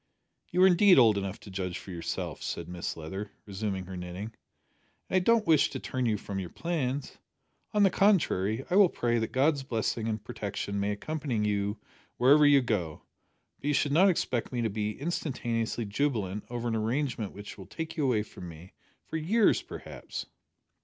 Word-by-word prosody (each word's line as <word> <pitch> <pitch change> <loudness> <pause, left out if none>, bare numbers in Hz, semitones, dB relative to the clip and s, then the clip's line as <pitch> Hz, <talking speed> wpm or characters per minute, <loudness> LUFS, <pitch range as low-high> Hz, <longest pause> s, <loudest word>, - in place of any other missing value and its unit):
"You 180 +2 +3
are - - +9
indeed 190 +1 +6
old 115 -5 +7
enough 100 0 -3
to 100 - -11
judge 90 -2 -3
for 95 - -9
yourself," 85 -2 -4
said - - -4
Mrs 90 -1 -5
Leather, 95 +6 -6
resuming 100 -2 -3
her 95 +1 -7
knitting, 90 +5 -6 0.8
"and 185 - +4
I - - +6
don't 225 +3 +3
wish 155 -5 +4
to - - -5
turn 130 -2 -2
you 110 -2 +1
from 100 -1 -5
your 90 -2 -5
plans. 140 - -3 0.5
On 210 -1 +3
the 195 - +5
contrary, 135 - +2
I 185 - +4
will 200 -3 +7
pray 120 -5 0
that 110 - -2
God's 140 +2 +2
blessing 115 -3 -2
and 110 -1 -2
protection 100 0 -4
may 100 +1 0
accompany 120 0 -2
you 100 +1 0 0.4
wherever 145 +4 +6
you 140 -1 +6
go, 90 -10 -2 0.6
but - - -5
you 145 - +2
should 145 0 +1
not 185 +7 +6
expect 125 -9 -1
me 120 -2 -1
to 110 - 0
be 105 0 -3
instantaneously 120 -7 -2
jubilant 105 -4 -1
over 120 0 -3
an 115 - 0
arrangement 115 -1 -1
which 100 +1 -9
will 95 - -10
take 160 - -6
you 155 - -1
away 120 -6 +2
from 90 -4 -10
me, 85 +3 -12 0.3
for 160 - -4
years 205 +8 +3
perhaps." - - -7
115 Hz, 185 wpm, -29 LUFS, 100-150 Hz, 0.8 s, are